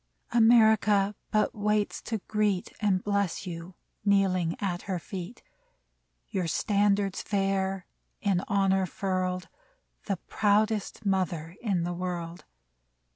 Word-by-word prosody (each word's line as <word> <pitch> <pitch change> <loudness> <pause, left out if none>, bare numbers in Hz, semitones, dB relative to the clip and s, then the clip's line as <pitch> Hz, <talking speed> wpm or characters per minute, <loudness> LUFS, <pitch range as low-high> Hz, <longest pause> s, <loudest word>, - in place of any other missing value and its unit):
America 220 -3 +5 0.2
but 215 0 +1
waits 210 0 0
to 225 - -3
greet 210 -3 0
And 195 -3 +2
bless 200 -2 -1
you, 175 0 -7 0.3
kneeling 190 -4 +2
at 180 -4 -2
her 185 - 0
feet, 185 +5 -7 0.8
Your 185 -3 -2
standards 200 +1 +1
fair, 195 -2 -1 0.3
in 195 -3 +1
honor 195 -1 +2
furled, 185 -1 -2 0.6
The 195 -3 -1
proudest 210 +3 0
mother 180 -4 -1
in 195 -7 0
the 175 +1 -2
world 175 -1 -5
195 Hz, 110 wpm, -28 LUFS, 180-205 Hz, 0.8 s, America